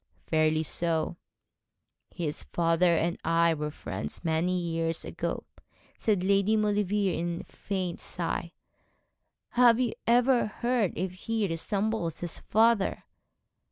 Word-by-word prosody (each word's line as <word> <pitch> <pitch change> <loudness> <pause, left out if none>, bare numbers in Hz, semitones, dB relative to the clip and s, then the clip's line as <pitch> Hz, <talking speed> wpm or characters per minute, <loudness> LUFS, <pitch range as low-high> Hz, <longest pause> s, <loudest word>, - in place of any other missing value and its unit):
'Fairly 155 0 +2
so.' 165 +1 -1 0.9
'His 155 -4 -3
father 170 0 +2
and 170 +2 0
I 165 0 +3
were 150 -1 -3
friends 150 - -6
many 170 +3 +1
years 165 -1 -2
ago,' - - -3 0.6
said 205 -5 +1
Lady 200 +2 +3
Maulevrier, 205 -4 +1
with - - -5
a - - -25
faint 185 -3 -3
sigh. 170 0 -3 1.0
'Have 240 -1 +5
you 245 -3 +1
ever 245 +1 +4
heard 235 -2 0
if 185 +2 -2
he 220 +3 -1
resembles 195 0 -1
his 175 -1 -5
father?' 220 -1 +2
180 Hz, 120 wpm, -28 LUFS, 165-215 Hz, 1.0 s, Have